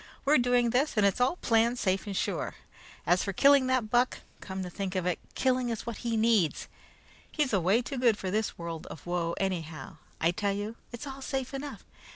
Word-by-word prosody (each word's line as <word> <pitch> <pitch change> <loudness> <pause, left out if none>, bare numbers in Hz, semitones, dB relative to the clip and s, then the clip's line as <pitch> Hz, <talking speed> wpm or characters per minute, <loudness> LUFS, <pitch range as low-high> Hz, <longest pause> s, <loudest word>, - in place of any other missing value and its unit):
"We're 290 0 +5
doing 245 -1 +3
this, 255 +1 +1
and 210 - +5
it's 200 +4 +2
all 255 +7 +3
planned 235 -5 +2
safe 190 -1 0
and 195 -2 -3
sure. - - -2 0.5
As 180 +1 +3
for 195 - -3
killing 275 +4 +5
that 255 -4 0
buck 245 +1 +2 0.2
come 190 -1 -5
to 180 - -5
think 195 0 -4
of 185 -2 0
it, 180 -2 0 0.2
killing 255 -1 +1
is 230 -2 -4
what 235 -2 -4
he 235 -2 -2
needs. 220 -7 +2 0.6
He's 295 -6 0
away 195 +5 +3
too 270 +1 -4
good 235 -4 +4
for 190 -3 -4
this 215 +1 -1
world 170 -2 -6
of 155 - -10
woe, 175 -1 -1
anyhow. 170 -3 -3 0.2
I 165 - +3
tell 200 +2 -1
you, 205 +3 -4 0.2
it's 240 +4 -7
all 270 -1 -7
safe 265 0 -3
enough. 280 +1 -6
220 Hz, 205 wpm, -29 LUFS, 185-250 Hz, 0.6 s, We're